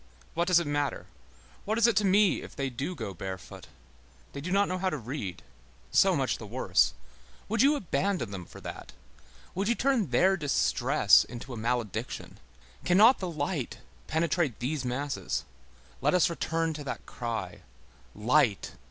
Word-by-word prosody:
What 170 Hz, +1 st, 0 dB
does 180 Hz, -2 st, +5 dB
it 170 Hz, -, -2 dB
matter? 145 Hz, -1 st, -1 dB, 0.6 s
What 215 Hz, +2 st, -1 dB
is 230 Hz, -, +5 dB
it 235 Hz, -, +4 dB
to 210 Hz, -, +3 dB
me 200 Hz, +1 st, +4 dB
if -, -, -11 dB
they 135 Hz, -2 st, -2 dB
do 140 Hz, +9 st, -4 dB
go 110 Hz, -, -5 dB
barefoot! 95 Hz, +1 st, -8 dB, 0.7 s
They 140 Hz, -, -6 dB
do 170 Hz, -, -5 dB
not 200 Hz, +1 st, +3 dB
know 185 Hz, 0 st, -2 dB
how 190 Hz, 0 st, +1 dB
to 155 Hz, -, -3 dB
read; 115 Hz, -, -6 dB, 0.5 s
so -, -, +5 dB
much -, -, 0 dB
the -, -, -8 dB
worse. -, -, +2 dB, 0.5 s
Would 220 Hz, +1 st, +1 dB
you 285 Hz, +2 st, +5 dB
abandon 185 Hz, -, -1 dB
them 95 Hz, -3 st, -6 dB
for -, -, -12 dB
that? -, -, -8 dB, 0.6 s
Would 195 Hz, +2 st, -1 dB
you 235 Hz, -, +2 dB
turn 255 Hz, -, +1 dB
their 185 Hz, +10 st, +3 dB
distress 145 Hz, -6 st, +4 dB
into 120 Hz, +2 st, -8 dB
a -, -, -6 dB
malediction? 115 Hz, -2 st, -3 dB, 0.4 s
Cannot 210 Hz, +8 st, +6 dB
the 185 Hz, -, -3 dB
light 145 Hz, -3 st, -3 dB, 0.3 s
penetrate 160 Hz, -4 st, 0 dB
these 135 Hz, +3 st, -2 dB
masses? 135 Hz, +3 st, -3 dB, 0.6 s
Let 150 Hz, +6 st, +3 dB
us 180 Hz, -1 st, +4 dB
return 165 Hz, -1 st, -1 dB
to 150 Hz, -1 st, -7 dB
that 140 Hz, -, -6 dB
cry: 115 Hz, -7 st, -5 dB, 0.5 s
Light! 115 Hz, 0 st, +2 dB
150 Hz, 165 wpm, -29 LUFS, 125-185 Hz, 0.7 s, Cannot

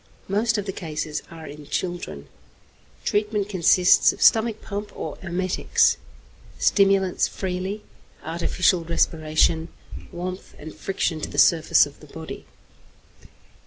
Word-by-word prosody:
Most 220 Hz, +4 st, +1 dB
of 205 Hz, -, -3 dB
the 195 Hz, -, -3 dB
cases 155 Hz, -4 st, -4 dB
are 165 Hz, -1 st, -10 dB
in 145 Hz, 0 st, -10 dB
children. 175 Hz, -, -4 dB, 0.8 s
Treatment 210 Hz, -1 st, 0 dB
consists 180 Hz, -1 st, +5 dB
of -, -, -12 dB
stomach 220 Hz, -1 st, +4 dB
pump 205 Hz, 0 st, -6 dB
or -, -, -5 dB
emetics, 185 Hz, 0 st, +1 dB, 0.6 s
stimulants 195 Hz, -2 st, +3 dB
freely, 190 Hz, +2 st, -4 dB, 0.4 s
artificial 170 Hz, +2 st, +1 dB
respiration, 160 Hz, 0 st, +1 dB, 0.4 s
warmth 180 Hz, +2 st, -6 dB
and 155 Hz, +1 st, -9 dB
friction 175 Hz, -4 st, -2 dB
to -, -, -4 dB
the -, -, -8 dB
surface 160 Hz, -3 st, +5 dB
of 145 Hz, -, -13 dB
the 150 Hz, -, -15 dB
body. 160 Hz, +2 st, -9 dB
180 Hz, 120 wpm, -24 LUFS, 160-195 Hz, 0.8 s, consists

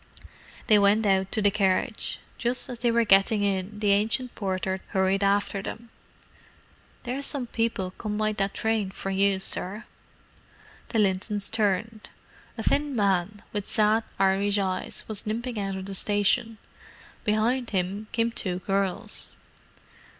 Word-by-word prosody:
They 215 Hz, -3 st, +6 dB
went 205 Hz, +2 st, +4 dB
out 190 Hz, -1 st, +2 dB
to 215 Hz, -, 0 dB
the 205 Hz, -, +5 dB
carriage. 200 Hz, +3 st, 0 dB, 0.2 s
Just 245 Hz, +2 st, -1 dB
as 245 Hz, -2 st, -6 dB
they 240 Hz, 0 st, +2 dB
were 230 Hz, 0 st, +3 dB
getting 205 Hz, +1 st, +4 dB
in, 195 Hz, +1 st, -1 dB
the 205 Hz, -1 st, +3 dB
ancient 220 Hz, +5 st, +1 dB
porter 190 Hz, -1 st, -2 dB
hurried 190 Hz, +1 st, +1 dB
after 200 Hz, 0 st, +1 dB
them. 230 Hz, +3 st, -7 dB, 1.1 s
"There's 260 Hz, +3 st, -3 dB
some 275 Hz, -4 st, +1 dB
people 225 Hz, -6 st, -1 dB
come 210 Hz, +2 st, -4 dB
by 215 Hz, 0 st, +1 dB
that 195 Hz, -1 st, -1 dB
train 220 Hz, -3 st, 0 dB
for 195 Hz, 0 st, -5 dB
you, 195 Hz, 0 st, +2 dB
sir." 195 Hz, +2 st, -3 dB, 1.1 s
The 230 Hz, -, -1 dB
Lintons 200 Hz, 0 st, 0 dB
turned. 215 Hz, +1 st, 0 dB, 0.5 s
A -, -, -3 dB
thin 290 Hz, -2 st, +1 dB
man, 200 Hz, -1 st, +1 dB
with 205 Hz, -2 st, -3 dB
sad 215 Hz, +1 st, +3 dB
Irish 195 Hz, +1 st, +2 dB
eyes, 190 Hz, -2 st, -2 dB
was 215 Hz, 0 st, -6 dB
limping 230 Hz, +1 st, -2 dB
out 195 Hz, -1 st, -2 dB
of 190 Hz, 0 st, -5 dB
the 195 Hz, -, -5 dB
station. 205 Hz, +3 st, +1 dB, 0.7 s
Behind 230 Hz, +4 st, +1 dB
him 195 Hz, +2 st, -2 dB
came 230 Hz, +1 st, +1 dB
two 185 Hz, -5 st, -2 dB
girls. 195 Hz, +3 st, -1 dB
205 Hz, 145 wpm, -26 LUFS, 195-225 Hz, 1.1 s, They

